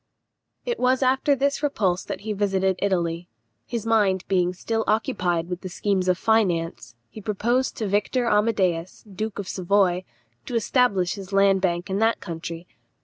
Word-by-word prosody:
It 485 -1 -2
was 255 +1 +2
after 265 +2 +3
this 280 +1 0
repulse 195 -11 0
that - - -5
he 215 +1 -3
visited 190 -2 +1
Italy. 175 -3 0 0.4
His 235 -3 -4
mind 205 -5 +2
being 180 -2 +2
still 225 +5 -2
occupied 185 -7 0
with 180 +1 -5
schemes 190 -1 0
of 180 -1 +3
finance, 170 - 0
he 215 - -11
proposed 235 +6 0
to 215 - -2
Victor 210 +5 0
Amadeus, 200 -6 +1
duke 210 0 -5
of 200 -2 -5
Savoy, 185 -1 +1 0.4
to 245 - -4
establish 215 -5 +2
his 195 -2 -9
land 195 -1 +4
bank 175 0 0
in 195 0 -1
that 225 +1 +2
country. 165 -1 -6
195 Hz, 155 wpm, -24 LUFS, 180-225 Hz, 0.4 s, land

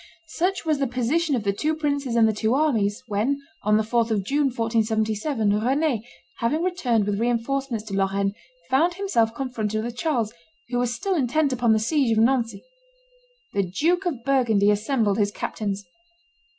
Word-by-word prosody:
Such 365 +3 -1
was 310 -3 +1
the 275 - +1
position 265 +6 0
of 230 - -2
the 200 -1 +1
two 310 +9 -1
princes 285 -5 -1
and 225 -1 +5
the 220 - +1
two 220 +3 +1
armies, 240 -7 +1
when, 230 +5 0 0.2
on 210 +1 +3
the 220 - +2
4th 230 +1 +1
of 210 -3 0
June, 285 +5 +1
1477, 220 -1 0
Rend, 270 -2 +1 0.3
having 295 +8 0
returned 255 - +1
with 205 0 -1
re 235 +2 +1
enforcements 240 -1 -2
to 205 - -7
Lorraine, 195 0 0 0.4
found 330 +7 +3
himself 235 - +1
confronted 220 -5 -2
with 240 +1 -5
Charles, 240 -6 -1 0.4
who 245 -1 0
was 245 -1 0
still 315 - -2
intent 285 -1 +1
upon 240 -2 +2
the - - +3
siege 230 0 +1
of 220 - +5
Nancy. 235 -2 +1 0.9
The 200 - +2
Duke 325 - 0
of 265 -9 -3
Burgundy 235 -7 +3
assembled 215 -1 +1
his 205 -1 +2
captains. 205 -1 -4
235 Hz, 175 wpm, -24 LUFS, 215-280 Hz, 0.9 s, and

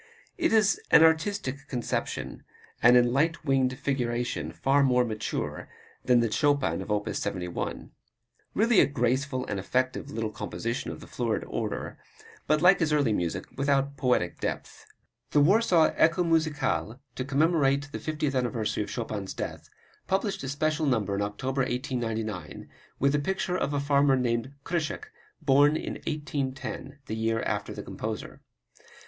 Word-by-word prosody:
It 335 -2 +1
is 220 -1 +3
an 160 - +8
artistic 160 -3 +1
conception, 120 -3 -3 0.4
and 125 +1 +7
in 120 0 +3
"light 160 +4 +1
winged 130 -2 +2
figuration" 120 -3 -2
far 140 +1 +2
more 125 -2 +3
mature 110 -2 -4 0.3
than 125 -2 +4
the 115 -2 0
Chopin 140 - +1
of 95 - -8
op. 105 0 0
71. 90 -3 -4 0.6
Really 225 0 +4
a - - +6
graceful 130 0 0
and 100 -2 -3
effective 130 +7 -1
little 110 -1 -3
composition 115 +2 -4
of - - -7
the - - -10
florid 115 -3 -2
order, - - -4 0.5
but 155 +2 +2
like 180 +2 +7
his 160 -3 +1
early 145 -7 +3
music 90 -1 -2
without 140 0 +1
poetic 125 -10 0
depth. - - -5 0.5
The 150 - +5
Warsaw 175 +1 +4
"Echo 170 +3 +3
Musicale," 150 -7 0
to 130 - -3
commemorate 140 0 +2
the - - -5
fiftieth 150 -3 -2
anniversary 120 -5 -1
of - - -8
Chopin's 105 -5 -4
death, - - -6 0.4
published 195 +1 0
a 135 - -3
special 155 +2 0
number 110 -6 +1
in 100 - -1
October, 130 +7 -2
1899, 115 - -3 0.3
with 140 +1 +3
the 145 - +2
picture 190 +3 -1
of 145 - -1
a 145 - 0
farmer 140 -1 +3
named 120 0 -1
Krysiak, 175 - -3 0.3
born 145 +1 +5
in - - -5
1810, 140 -2 -4
the 110 - -4
year 115 0 0
after - - -2
the - - -6
composer. - - -6
135 Hz, 150 wpm, -28 LUFS, 120-150 Hz, 0.6 s, an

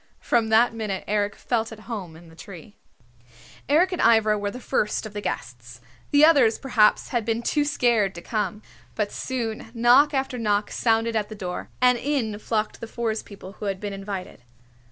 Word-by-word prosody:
From 230 -2 +1
that 225 +2 +4
minute 210 -4 -4
Eric 205 0 0
felt 225 -2 -2
at 220 -1 -10
home 205 -8 -7
in 165 +1 -15
the 160 - -17
tree. 180 +3 -12 0.9
Eric 340 +6 +4
and 360 - -2
Ivra 220 -2 +4
were 205 -1 -2
the 250 - -8
first 215 -3 -1
of 215 - -8
the 205 - -4
guests. 120 - -6 0.3
The 290 +1 +6
others 270 -9 +5
perhaps 235 -6 +2
had 240 -3 -1
been 225 +1 -2
too 295 +4 +1
scared 235 - +1
to 170 - -8
come. 215 -1 -3 0.3
But 210 -2 -1
soon 230 -4 -4
knock 245 +5 +5
after 265 -2 -2
knock 210 -2 0
sounded 225 0 +1
at 210 -1 -1
the 215 - -7
door, 180 -3 -5
and 250 -1 +5
in 240 -7 -1
flocked 215 0 -2
the 230 - -5
Forest 225 -1 -3
People 195 -2 -11
who - - -5
had 195 -2 -2
been 205 0 -5
invited. 195 -6 -7
220 Hz, 190 wpm, -24 LUFS, 205-240 Hz, 0.9 s, The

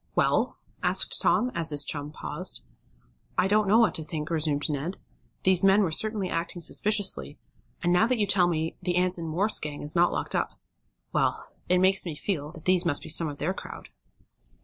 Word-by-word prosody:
"Well?" - - +1 0.2
asked - - +2
Tom, 250 +1 +2
as 165 -1 +1
his 145 -1 +1
chum 145 0 -3
paused. - - -3 0.7
"I 185 - +3
don't 210 +1 +2
know 210 +3 +5
what 220 -7 +4
to 160 - 0
think," 155 0 -5
resumed 150 -3 +1
Ned. 155 +5 -4 0.5
"These 185 -1 +3
men 195 +2 +5
were 175 - -1
certainly 215 +2 +1
acting 170 +1 -3
suspiciously, 190 - +1 0.5
and, 175 - +2
now 180 +5 +4
that 250 0 0
you 210 - +1
tell 190 -3 +3
me 160 -1 -2
the 180 -1 -1
Anson 180 -2 +1
Morse 190 +7 +1
gang 150 -1 -6
is 150 +3 -3
not 175 +1 +4
locked - - -3
up - - -2 0.5
well, - - 0 0.2
it 180 - +4
makes 190 +1 +4
me 170 -4 -5
feel 150 -3 -3
that 160 -3 -13
these 185 -1 +3
must 160 -5 +1
be - - -8
some 165 +1 +2
of 145 -1 -6
their 180 +6 -1
crowd." - - -10
175 Hz, 195 wpm, -27 LUFS, 155-190 Hz, 0.7 s, know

